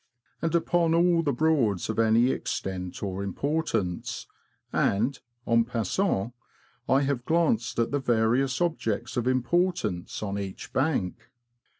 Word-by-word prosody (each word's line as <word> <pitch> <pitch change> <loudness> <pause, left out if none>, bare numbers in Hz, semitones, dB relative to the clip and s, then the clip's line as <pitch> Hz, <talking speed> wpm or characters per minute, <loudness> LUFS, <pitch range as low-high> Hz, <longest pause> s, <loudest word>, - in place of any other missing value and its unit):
and 165 0 0
upon 165 0 +2
all 170 0 +4
the 150 -3 0
Broads 125 - +1
of 110 0 -2
any 115 +3 +4
extent 90 -1 -4
or 95 -1 -3
importance; 110 - -2 0.5
and, 115 +7 +1 0.3
en 115 0 +4
passant^ 115 - -1 0.6
I 135 +1 +4
have 135 -3 -1
glanced 155 -7 +1
at 115 -1 +1
the 145 - +1
various 125 +3 +1
objects 120 -9 -1
of 120 -1 0
importance 130 - 0
on 100 -1 -2
each 95 -1 -7
bank. 115 - -1
120 Hz, 125 wpm, -27 LUFS, 105-155 Hz, 0.6 s, all